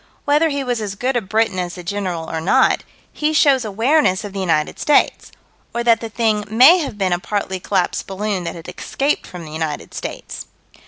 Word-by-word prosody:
Whether 300 +3 +3
he 280 -2 -2
was 245 -3 -2
as 200 -2 -4
good 255 +5 -1
a 240 - +2
Briton 215 -1 0
as 175 -1 -3
the 180 - -9
General 180 -3 -3
or 160 0 -3
not, 170 - +3 0.3
he 305 +1 0
shows 280 -4 +4
awareness 220 0 +2
of 205 -2 -7
the 200 - -4
United 165 -5 0
States 295 - +2 0.4
or 235 - 0
that 230 -1 +4
the 230 - -5
thing 220 -1 0
may 255 - +7
have 280 -10 -4
been 190 -3 +1
a 175 - 0
partly 190 -1 -3
collapsed 185 -1 -1
balloon 195 -1 -2
that - - -4
had 165 -1 -10
escaped 280 +2 -2
from 175 -2 -9
the 155 - -10
United 155 -2 -4
States. - - -7
210 Hz, 205 wpm, -19 LUFS, 185-250 Hz, 0.4 s, may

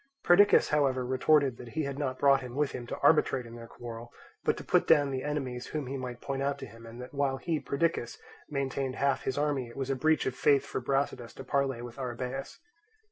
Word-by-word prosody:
Perdiccas 200 +4 +6
however 135 -4 +2
retorted 130 0 +3
that 120 -1 -10
he 155 - +2
had 140 0 -4
not 130 -3 -2
brought 140 -1 +4
him 125 -1 -8
with 145 0 +1
him 120 -1 -6
to - - -4
arbitrate 140 -4 +4
in 115 - -11
their 115 -1 -9
quarrel, 120 0 -9 0.3
but - - +1
to - - -7
put - - +2
down 145 -3 +5
the 130 -1 -2
enemies 130 -4 -3
whom 150 -3 -3
he 135 +2 -4
might 125 -2 -6
point 135 -1 -3
out 140 0 0
to 135 - -7
him; 115 -1 -13
and 115 +2 -10
that 125 +2 -9
while 140 -1 0
he, 160 +2 -1
Perdiccas, 140 -5 -1 0.3
maintained 135 -2 -2
half 140 -1 0
his 130 - -1
army 145 -4 0
it 120 - -13
was 135 0 -2
a - - +1
breach 155 +4 +2
of 130 - -1
faith 140 0 +3
for 130 - -4
Brasidas 130 -2 -1
to 135 - -8
parley 135 -2 0
with 120 +2 -9
Arrhabaeus. 125 +2 -4
135 Hz, 230 wpm, -30 LUFS, 125-140 Hz, 0.3 s, Perdiccas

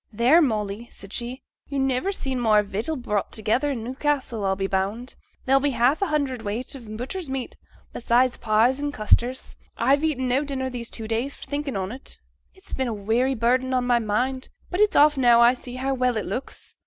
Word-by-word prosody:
'Theere, 245 +10 +5
Molly!' 215 -4 -1
said 195 +1 -13
she. 245 +2 -5 0.3
'Yo' 280 - -3
niver 270 +7 +1
seed 265 -9 -2
more 215 -3 +4
vittle 215 +10 -3
brought 210 -7 -2
together 225 +7 0
i' 280 - -1
Newcassel, 255 -1 -2
I'll 190 -1 +1
be 195 0 -2
bound; 200 +6 -2 0.3
there'll 270 +1 +4
be 290 - +2
above 250 - -4
half 255 +9 +3
a 395 - +2
hundredweight 255 -6 -2
o' - - -7
butcher's 250 - -6
meat, 265 -2 -4 0.4
beside 245 +1 +2
pies 230 +5 +3
and 290 0 -2
custards. 240 +2 0 0.2
I've 275 +5 +3
eaten 270 -5 0
no 255 +3 +2
dinner 265 -2 -3
these 235 -2 -5
two 220 -1 -5
days 235 +5 -1
for - - -11
thinking 285 -2 -3
on 190 +1 -3
't; 260 +3 -6 0.4
it's 380 - -11
been 260 -1 -1
a 235 - -2
weary 230 +6 +1
burden 255 +3 +1
on 250 -1 +1
my 245 -1 +3
mind, 250 +4 -1 0.2
but 360 - -2
it's 420 -1 +4
off 295 0 +6
now 240 -3 +5
I 235 +1 +7
see 250 0 -9
how 265 +1 -1
well 250 -2 +1
it 210 - -2
looks. 245 +8 -6
250 Hz, 205 wpm, -24 LUFS, 225-270 Hz, 0.4 s, I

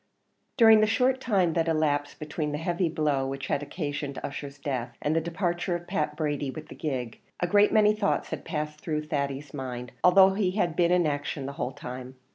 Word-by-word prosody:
During 225 -3 +8
the 215 - +4
short 255 +4 +2
time 190 -9 +2
that 165 0 +1
elapsed 150 -3 0
between 150 -1 -3
the - - -1
heavy 170 +2 0
blow 150 -4 0
which 135 0 -4
had 140 - +1
occasioned 145 -2 -4
Ussher's 140 0 -6
death, 125 -4 -4
and 150 +2 0
the 165 - +2
departure 175 +1 -1
of 175 0 -6
Pat 155 -5 -1
Brady 145 -3 -1
with 155 +3 -8
the - - -8
gig, 125 -6 -4 0.2
a - - +1
great 205 +4 +4
many 215 -1 +5
thoughts 210 -1 -1
had - - -4
passed 150 -1 -4
through 155 -2 -2
Thady's 140 -1 -3
mind, 125 -3 -5
although 190 +1 +7
he 195 -2 +1
had 175 -6 0
been 170 -1 +3
in 180 -1 +4
action 145 -1 -2
the 140 - -5
whole 125 - -1
time. 125 +1 -8
155 Hz, 205 wpm, -27 LUFS, 140-175 Hz, 0.2 s, During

